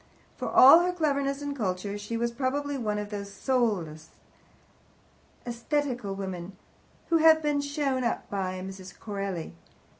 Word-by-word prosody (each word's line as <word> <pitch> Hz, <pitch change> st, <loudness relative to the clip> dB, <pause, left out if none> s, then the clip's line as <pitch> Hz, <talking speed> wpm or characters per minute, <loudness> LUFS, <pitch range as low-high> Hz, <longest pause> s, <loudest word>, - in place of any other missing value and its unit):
For -, -, -4 dB
all 275 Hz, +6 st, +9 dB
her 355 Hz, +1 st, +1 dB
cleverness 280 Hz, -4 st, -1 dB
and 285 Hz, -1 st, -3 dB
culture, 200 Hz, -3 st, -2 dB
she 205 Hz, +3 st, -4 dB
was 235 Hz, +1 st, 0 dB
probably 280 Hz, +3 st, -2 dB
one 215 Hz, -5 st, -2 dB
of 210 Hz, 0 st, -5 dB
those 200 Hz, -1 st, -5 dB
soulless, 195 Hz, -, -1 dB, 1.4 s
atheistical 245 Hz, -3 st, -2 dB
women 190 Hz, -1 st, -6 dB, 0.5 s
who 335 Hz, -, +4 dB
have 320 Hz, 0 st, +6 dB
been 295 Hz, -1 st, +1 dB
so 285 Hz, -, -5 dB
shown 275 Hz, -3 st, -1 dB
up 235 Hz, -, -2 dB
by 185 Hz, -2 st, -3 dB
Miss 190 Hz, -1 st, -8 dB
Corelli. 195 Hz, -, -5 dB
235 Hz, 145 wpm, -28 LUFS, 195-285 Hz, 1.4 s, all